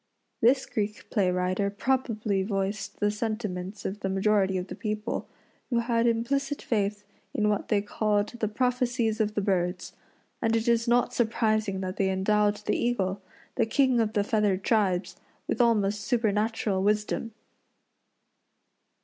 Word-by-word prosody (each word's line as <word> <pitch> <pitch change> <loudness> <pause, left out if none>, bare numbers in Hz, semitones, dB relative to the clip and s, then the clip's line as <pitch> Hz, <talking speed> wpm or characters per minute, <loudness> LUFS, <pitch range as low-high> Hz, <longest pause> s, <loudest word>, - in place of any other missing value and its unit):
This 260 +4 +4
Greek 210 0 -3
play 195 -5 +2
writer 185 +2 0
probably 215 -2 0
voiced 195 0 -3
the 205 0 +2
sentiments 210 -3 -4
of 200 +2 -3
the 195 - -2
majority 195 0 +2
of 180 - -3
the - - -8
people, 215 +1 -3 0.4
who 240 - +1
had 235 0 +2
implicit 275 +5 0
faith 205 -2 -1 0.3
in 210 0 +2
what 205 - -1
they 205 -2 +1
called 210 0 0
"the 230 -3 -3
prophecies 240 -1 0
of 215 0 -1
the 205 - +1
birds;" 180 -2 -1 0.5
and 225 -1 +2
it 225 0 0
is 235 0 +2
not 245 +1 +3
surprising 215 -4 +1
that 185 +1 -4
they 195 -1 +2
endowed 205 +2 +2
the - - +1
eagle 200 -5 0 0.4
the 230 -3 +2
king 260 0 +3
of 220 -1 +1
the 205 - +2
feathered 205 -3 +1
tribes 200 -5 +1 0.3
with - - +1
almost 210 -3 +2
supernatural 215 -3 0
wisdom. 210 +2 0
210 Hz, 150 wpm, -27 LUFS, 200-230 Hz, 0.5 s, This